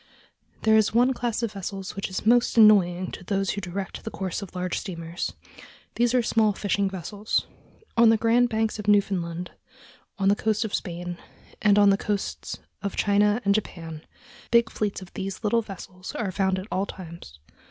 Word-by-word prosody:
There 220 0 +5
is 220 0 +3
one 250 +3 +4
class 240 -1 -2
of 230 - -1
vessels 195 -1 -6
which 195 - -3
is 190 - -4
most 240 +1 +4
annoying 185 -5 +5
to - - -8
those 195 0 0
who 200 - -4
direct 190 0 -5
the - - -4
course 190 -2 -4
of 195 -2 -9
large 180 -1 -2
steamers. 170 -3 -5 0.6
These 240 +1 +2
are 245 - +3
small 220 -2 +2
fishing 200 0 0
vessels. 200 +3 -2 0.5
On 235 -1 +6
the 225 - +5
Grand 235 +2 +3
Banks 220 -1 -1
of 210 - -6
Newfoundland, 180 -4 +1 0.7
on 195 - +1
the 200 - +5
coast 215 +1 0
of 215 - -6
Spain, 175 0 -4 0.4
and 205 -1 +4
on 205 -1 +6
the 195 - +3
coasts 205 -2 -3 0.2
of 200 -2 -3
China 210 +3 +2
and 200 - +4
Japan 165 -6 -4 0.5
big 235 -1 +4
fleets 205 -2 -2
of 180 - -15
these 195 +2 -5
little 230 +2 +2
vessels 185 -3 -9
are 205 -5 -2
found 190 0 +1
at 185 - -5
all 195 +2 0
times. 170 - -10
200 Hz, 185 wpm, -25 LUFS, 185-220 Hz, 0.7 s, On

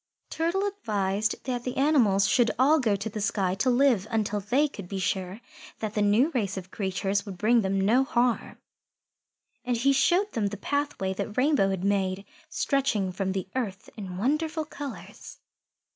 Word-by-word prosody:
Turtle 340 +5 0
advised 215 - -1
that 245 -2 -3
the 250 - -4
animals 235 -9 +3
should 240 0 +3
all 290 +6 +4
go 225 -6 +2
to 205 +2 -4
the 215 0 -5
sky 200 -2 0
to 215 +7 0
live 245 -5 +3
until 210 -2 0
they 250 +9 +1
could 200 -10 -9
be 195 - -5
sure 190 +2 -2 0.4
that 215 -1 -4
the 210 - 0
new 215 +10 +3
race 200 - -2
of 190 0 -7
creatures 195 0 -1
would 195 -4 -8
bring 230 +5 +3
them 195 -1 0
no 225 +7 +3
harm. 245 -2 0 1.1
And 245 -1 -1
he 275 +4 +3
showed 350 +9 +2
them 220 -4 -1
the 205 +1 -5
pathway 285 -7 -2
that 205 +3 -5
Rainbow 260 -7 +3
had 190 -2 -2
made, 195 -1 0 0.2
stretching 260 -9 0
from 190 +1 -2
the 190 -1 -3
earth 205 -7 -4
in 190 -4 -7
wonderful 305 - 0
colours. 220 - -9
215 Hz, 175 wpm, -27 LUFS, 195-265 Hz, 1.1 s, all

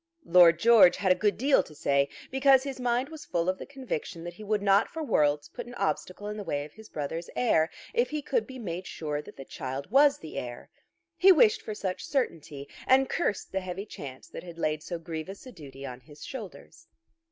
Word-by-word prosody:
Lord 170 -2 +7
George 200 -3 +7
had 190 -1 +2
a 185 - +2
good 210 -1 +2
deal 270 +4 +4
to 155 - -14
say, 140 -1 +1 0.2
because 265 0 +5
his 275 -2 -5
mind 250 +2 0
was 315 -1 -9
full 170 0 -1
of 185 0 0
the - - -8
conviction 255 - -5
that 175 0 -6
he 215 - -11
would 210 -1 -1
not 200 +1 +4
for 320 - -5
worlds 150 - +1
put - - -8
an 245 - -10
obstacle 195 -1 -2
in 210 0 -5
the 205 - -5
way 145 -5 -2
of 150 - -14
his 220 0 -14
brother's 160 +3 -4
heir, 165 -10 +3 0.2
if 240 +1 +2
he 300 -1 -3
could 480 - 0
be 260 -2 -9
made 185 -6 -5
sure 150 -2 -4
that - - -14
the 135 - -8
child 135 +2 -6
was 280 +1 +6
the 160 - -6
heir. 120 -1 -8 0.5
He 385 +1 +7
wished 270 - +5
for 215 - -6
such 190 -3 -4
certainty, 155 - -3 0.2
and 265 0 +4
cursed 270 - -1
the 190 - -1
heavy 185 +2 -5
chance 135 -10 -9
that - - -8
had 170 -2 -11
laid 155 -2 -1
so 175 +2 -5
grievous 165 +5 -7
a 255 - -9
duty 140 - -10
on 125 -1 -7
his 145 +4 -13
shoulders. 265 - -9
190 Hz, 220 wpm, -28 LUFS, 155-250 Hz, 0.5 s, Lord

